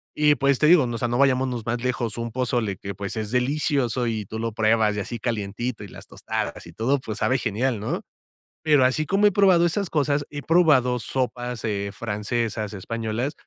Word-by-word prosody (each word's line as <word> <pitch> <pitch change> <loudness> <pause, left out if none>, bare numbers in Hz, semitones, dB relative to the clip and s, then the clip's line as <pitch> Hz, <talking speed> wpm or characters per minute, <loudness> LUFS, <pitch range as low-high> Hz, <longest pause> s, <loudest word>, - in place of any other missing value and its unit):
y 150 -1 +4
pues, 140 0 +2
te - - +3
digo, 155 -6 +6
¿no? 120 - -3
O - - -2
sea, 120 +1 -1
no 120 - -1
vayámonos 130 -4 +1
más 120 0 -2
lejos, 120 -3 -2
un 115 0 -4
pozole 120 -5 -1
que, 100 +1 -7
pues, 100 +2 -5
es 110 -1 -3
delicioso, 125 -2 0
y 110 -2 -2
tú 110 +3 -6
lo 115 -1 -3
pruebas, 110 -1 +2
y - - -2
así 115 +4 -6
calientito, 110 +1 -3
y - - -8
las - - -12
tostadas, - - -4
y 85 - -12
todo, 120 +9 +1
pues, 110 -3 -6
sabe 130 - +2
genial, 120 0 -1
¿no? 105 - -3 0.6
Pero, 145 -5 +4
así 145 +4 +1
como 195 +6 +2
he 205 - +6
probado 185 -3 +4
esas 185 +2 -1
cosas, 145 -1 0
he 145 -1 -6
probado 145 -8 +3
sopas, 125 -1 -3
eh, 100 -2 -2
francesas, 110 -1 -3
españolas, 115 +6 -3
120 Hz, 205 wpm, -24 LUFS, 110-140 Hz, 0.6 s, digo